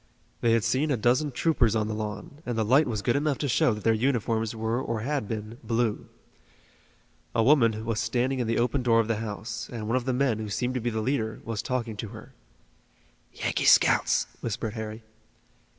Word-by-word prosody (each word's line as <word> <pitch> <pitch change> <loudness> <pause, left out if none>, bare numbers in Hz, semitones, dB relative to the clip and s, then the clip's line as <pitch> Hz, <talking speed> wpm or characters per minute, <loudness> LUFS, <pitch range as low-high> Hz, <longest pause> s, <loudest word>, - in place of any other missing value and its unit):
They 115 -1 +3
had 115 -2 +2
seen 140 +8 +1
a 135 - +1
dozen 125 +6 +2
troopers 120 -6 +2
on 105 -1 +1
the 110 - -2
lawn, 110 +9 -6
and 120 -2 -3
the 110 - +1
light 135 +8 +4
was 110 -4 -3
good 120 - +2
enough 145 -1 +1
to 145 - -2
show 120 - +3
that 105 - -9
their 115 - +4
uniforms 115 -2 0
were 110 +3 -1
or 115 -4 -3
had 140 -2 -2
been 110 +2 -5
blue. 115 -2 -1 1.3
A 115 - +3
woman 115 -5 +3
was 115 -1 -1
standing 125 +4 0
in 120 - -1
the 115 - 0
open 125 +3 +1
door 115 -2 +3
of 115 - +1
the 115 -2 0
house, 110 0 -5
and 115 -3 -5
one 115 +3 +2
of 125 - -3
the 130 - +1
men, 125 -4 +1
who 110 -1 -4
seemed 125 +5 -1
to 125 - -2
be 120 - 0
the 110 -1 -2
leader, 110 -2 -1
was 115 -2 -3
talking 120 -4 -2
to 110 - -4
her. 110 +4 -12 1.0
"Yankee - - -2
scouts," - - +5 0.2
whispered 110 -1 -3
Harry. 110 0 -6
115 Hz, 210 wpm, -27 LUFS, 110-125 Hz, 1.3 s, scouts